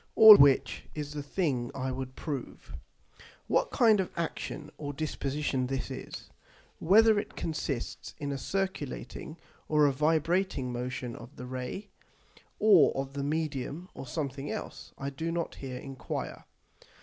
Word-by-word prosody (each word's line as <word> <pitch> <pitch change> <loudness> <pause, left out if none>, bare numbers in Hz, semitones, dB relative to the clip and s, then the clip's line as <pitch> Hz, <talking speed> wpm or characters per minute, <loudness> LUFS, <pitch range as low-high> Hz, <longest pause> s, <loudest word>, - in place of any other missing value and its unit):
All 220 -1 +12
which 140 -6 +4
is 150 -1 -4
the 150 - -3
thing 140 -5 -1
I 130 -1 -2
would 130 0 -5
prove. 145 -5 -6 0.7
What - - +2
kind 225 -5 +4
of 190 - 0
action 170 -2 -4
or 145 -1 -4
disposition 140 -3 -2
this 135 0 -3
is; - - -8 0.5
Whether 215 +5 +6
it - - -7
consists 150 -6 -4
in 145 -2 -3
a 140 - -2
circulating 185 -4 -4 0.3
or 150 -1 +5
a 145 - +4
vibrating 155 -1 +1
motion 125 0 -4
of 120 +4 -12
the 125 - -8
Ray, 130 +11 -5 0.7
or 205 -7 +6
of 135 0 -4
the 140 0 -3
Medium, 155 +3 -3
or 135 - -8
something 140 0 -4
else, - - -6
I 140 0 -4
do 160 +5 -3
not 170 -1 -2
here 130 -2 -5
enquire. 135 -1 -6
145 Hz, 145 wpm, -30 LUFS, 130-165 Hz, 0.7 s, All